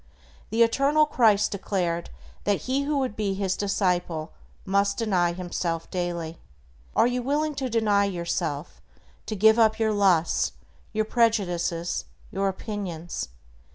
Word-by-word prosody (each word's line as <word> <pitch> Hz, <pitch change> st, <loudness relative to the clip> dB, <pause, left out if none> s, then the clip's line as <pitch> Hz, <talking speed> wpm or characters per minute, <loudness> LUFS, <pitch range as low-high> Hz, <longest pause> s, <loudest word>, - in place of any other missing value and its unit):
The 225 Hz, +2 st, +4 dB
eternal 280 Hz, +6 st, +3 dB
Christ 220 Hz, -8 st, +3 dB
declared 180 Hz, -4 st, -2 dB, 0.4 s
that 205 Hz, -1 st, +1 dB
he 270 Hz, +2 st, -1 dB
who 295 Hz, 0 st, 0 dB
would 260 Hz, -6 st, -1 dB
be 200 Hz, -3 st, -1 dB
His 190 Hz, -1 st, 0 dB
disciple 180 Hz, -5 st, -1 dB, 0.3 s
must 200 Hz, +1 st, +1 dB
"deny 185 Hz, -7 st, +2 dB
himself 170 Hz, -2 st, -3 dB
daily." 170 Hz, -2 st, -3 dB, 0.6 s
Are -, -, +5 dB
you 245 Hz, +1 st, 0 dB
willing 295 Hz, +4 st, 0 dB
to 260 Hz, -, -1 dB
deny 210 Hz, -3 st, +3 dB
yourself, 170 Hz, -, -3 dB, 0.5 s
to 215 Hz, -, -2 dB
give 220 Hz, +3 st, +5 dB
up 220 Hz, -1 st, +4 dB
your 220 Hz, -1 st, +1 dB
lusts, 190 Hz, -5 st, +2 dB, 0.4 s
your 215 Hz, 0 st, 0 dB
prejudices, 180 Hz, -7 st, 0 dB, 0.3 s
your 195 Hz, +1 st, 0 dB
opinions? 190 Hz, -4 st, -4 dB
200 Hz, 130 wpm, -26 LUFS, 175-225 Hz, 0.6 s, Are